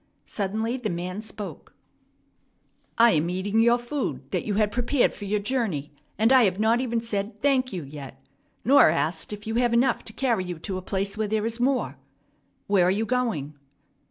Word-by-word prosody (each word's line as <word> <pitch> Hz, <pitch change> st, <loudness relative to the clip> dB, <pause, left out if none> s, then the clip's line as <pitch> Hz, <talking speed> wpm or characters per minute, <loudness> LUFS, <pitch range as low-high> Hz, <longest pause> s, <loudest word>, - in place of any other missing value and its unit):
Suddenly 220 Hz, +4 st, -2 dB
the 235 Hz, -4 st, -3 dB
man 180 Hz, +3 st, -4 dB
spoke. 215 Hz, -2 st, -8 dB, 1.2 s
"I 235 Hz, 0 st, +7 dB
am 160 Hz, 0 st, +1 dB
eating 195 Hz, +4 st, 0 dB
your 235 Hz, +1 st, +5 dB
food 240 Hz, -, -4 dB
that -, -, -1 dB
you 205 Hz, -, -1 dB
had 210 Hz, 0 st, +2 dB
prepared 245 Hz, +3 st, +1 dB
for 205 Hz, -, -8 dB
your 210 Hz, +1 st, 0 dB
journey, 205 Hz, -, -2 dB, 0.3 s
and 225 Hz, +5 st, +4 dB
I 255 Hz, -3 st, +7 dB
have 190 Hz, 0 st, 0 dB
not 225 Hz, +3 st, +3 dB
even 235 Hz, -3 st, -1 dB
said, 210 Hz, -2 st, -3 dB
'Thank 260 Hz, 0 st, +2 dB
you' 180 Hz, -5 st, -4 dB
yet, 135 Hz, -1 st, -10 dB, 0.5 s
nor 275 Hz, -, +7 dB
asked 160 Hz, +3 st, -1 dB
if 210 Hz, 0 st, -7 dB
you 220 Hz, -, -3 dB
have 240 Hz, -1 st, +2 dB
enough 245 Hz, +1 st, +2 dB
to -, -, -7 dB
carry 235 Hz, -5 st, 0 dB
you 180 Hz, -2 st, -5 dB
to 185 Hz, +3 st, -4 dB
a -, -, -9 dB
place 195 Hz, +2 st, -3 dB
where 215 Hz, -, 0 dB
there 215 Hz, +1 st, 0 dB
is 230 Hz, +1 st, -3 dB
more. 245 Hz, -, 0 dB, 0.7 s
Where 195 Hz, -3 st, +3 dB
are -, -, +4 dB
you 205 Hz, +4 st, +1 dB
going?" 225 Hz, -, -1 dB
215 Hz, 190 wpm, -25 LUFS, 185-235 Hz, 1.2 s, I